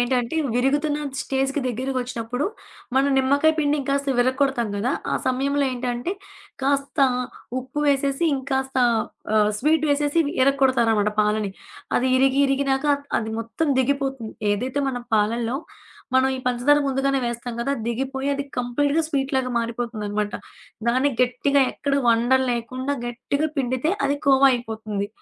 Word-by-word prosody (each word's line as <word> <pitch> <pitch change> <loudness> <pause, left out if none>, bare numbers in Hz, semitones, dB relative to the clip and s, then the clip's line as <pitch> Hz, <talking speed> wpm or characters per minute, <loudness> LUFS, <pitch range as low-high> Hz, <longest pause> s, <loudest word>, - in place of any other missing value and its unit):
ఏంటంటే 245 +3 0 0.2
విరుగుతున్న 290 +4 +1 0.2
స్టేజికి 270 +1 -1
దగ్గరగొచ్చినప్పుడు 250 0 -3 0.5
మనం 270 +1 +3
నిమ్మకాయ 285 +4 +3
పిండి 295 0 +2
ఇంకాస్త 275 0 0
విరక్కొడతాం 260 -2 +1
కదా! 245 +7 0 0.2
ఆ - - +2
సమయంలో 275 +2 +1
ఏంటంటే, 245 +6 -2 0.5
కాస్త 275 0 0 0.6
ఉప్పు 260 +3 -5
వేసేసి 275 +2 +1
ఇంకాస్త 265 0 -2 0.6
ఆహ్, 210 0 +4
స్వీటు 310 +4 +2
వేసేసి 290 +2 +1 0.2
ఇరక్కొడతారనమాట 255 -6 +3
పాలని. 210 -1 +1 0.5
అది 255 - +1
ఇరిగి, 270 0 +3
ఇరిగినాక 275 +1 0 0.3
అది 220 -1 -4
మొత్తం 230 +8 -2
దిగిపోతుంది. 270 -3 -1 0.2
ఏదైతే 255 +6 -2
మనం 245 -2 -3
పాలల్లో 230 +4 0 0.6
మనం 260 0 +4
ఈ - - -3
పంచదార 250 +4 +3
ముందుగానే 270 +1 +1
వేస్తాం 235 0 -4
గదా! 275 +4 0
దిగిపోయి 265 +3 -2
అది 280 - -2
కంప్లీట్‌గా 285 +6 +1
స్వీటులాగా 270 -3 0
మారిపోతుందనమాట. 220 -3 -3 0.6
దాన్ని 260 +4 +2
గట్టిగా 270 +3 +2
ఎక్కడ 280 -1 -2
వండలు 245 +3 +3
లేకుండా 255 +4 -3
గట్టిగా 280 +5 -2
పిండితే, 260 +4 0 0.2
అది 285 - 0
కోవా 275 0 +6
అయిపోతుంది. 220 -4 -3
265 Hz, 125 wpm, -23 LUFS, 240-280 Hz, 0.6 s, కోవా